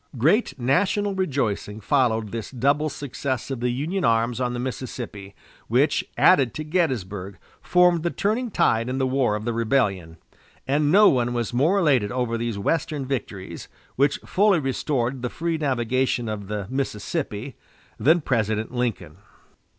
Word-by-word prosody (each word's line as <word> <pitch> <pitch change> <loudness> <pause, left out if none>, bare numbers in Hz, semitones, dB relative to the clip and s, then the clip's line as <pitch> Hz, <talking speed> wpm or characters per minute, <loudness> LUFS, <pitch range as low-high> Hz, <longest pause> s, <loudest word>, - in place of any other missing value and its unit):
Great 150 - +2
national 195 +10 +1
rejoicing 130 - -2
followed 110 -3 +1
this 115 -2 -5
double 140 +4 +1
success 140 -1 -4
of 130 - -3
the 125 +1 0
Union 155 +10 -2
arms 115 +2 +1
on 125 -1 0
the 120 - -3
Mississippi, 120 -6 -6 0.3
which, - - +2
added 130 -4 +4
to 155 - -3
Gettysburg, 105 - -2 0.2
formed 180 -2 +4
the 170 - 0
turning 220 +7 -1
tide 115 - +1
in 130 - -2
the 135 - +1
war 130 -4 +1
of 105 +1 -5
the 120 - -1
rebellion; 105 -8 0 0.5
and 145 +2 +2
no 205 +3 +7
one 120 -4 +2
was 120 0 -2
more 155 +11 +3
elated 135 - +2
over 125 -2 -1
these 115 -2 -2
Western 145 +5 -1
victories, 110 -8 -5 0.3
which 140 +1 +2
fully 200 -1 +3
restored 135 -2 -1
the 125 - -2
free 165 +2 -2
navigation 130 -3 0
of 105 -2 -5
the 105 -1 -3
Mississippi, 130 - -3 0.4
than 165 +5 +4
President 110 -4 -1
Lincoln. 120 -4 -3
130 Hz, 150 wpm, -24 LUFS, 115-150 Hz, 0.5 s, no